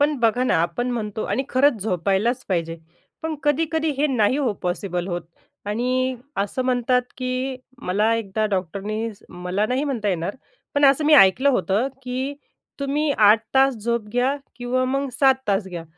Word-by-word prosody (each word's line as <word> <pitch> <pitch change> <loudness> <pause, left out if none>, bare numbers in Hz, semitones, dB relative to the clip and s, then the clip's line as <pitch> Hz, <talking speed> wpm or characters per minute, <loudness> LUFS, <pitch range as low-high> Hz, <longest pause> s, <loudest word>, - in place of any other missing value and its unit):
पण 295 +1 +3
बघा 240 +2 +2
ना, - - +2
आपण 210 +9 -2
म्हणतो 215 -3 -3
आणि 265 - -1
खरंच 255 -5 +3
झोपायलाचं 200 +5 0
पाहिजे. 165 -3 -1 0.5
पण 320 -1 -2
कधी-कधी 315 +2 +1
हे 300 - +3
नाही 255 -1 +2
हो 260 -6 +1
पॉसिबल 180 0 -2
होत 175 -1 -3 0.4
आणि 255 +4 0 0.2
असं 205 +6 -1
म्हणतात, 250 0 +2
की 255 +1 -2 0.3
मला 210 +5 +2
एकदा 215 -1 -2
डॉक्टरनी 205 +4 -3
स - - -25
मला 180 +4 -2
नाही 255 +5 0
म्हणता 235 -8 -2
येणार 180 +4 -2 0.4
पण 285 0 +3
असं 275 +3 +5
मी 305 +1 +6
ऐकलं 260 +3 +6
होतं, 230 -1 +1
की 260 +3 -3 0.5
तुम्ही 290 +2 0
8 215 -1 +5
तास 270 0 +5
झोप 235 -3 -1
घ्या 255 +3 +1 0.2
किंवा 250 +1 0
मग 275 +1 -1
7 265 -1 +6
तास 195 0 +1
घ्या. 170 -2 -6
245 Hz, 165 wpm, -23 LUFS, 200-265 Hz, 0.5 s, मी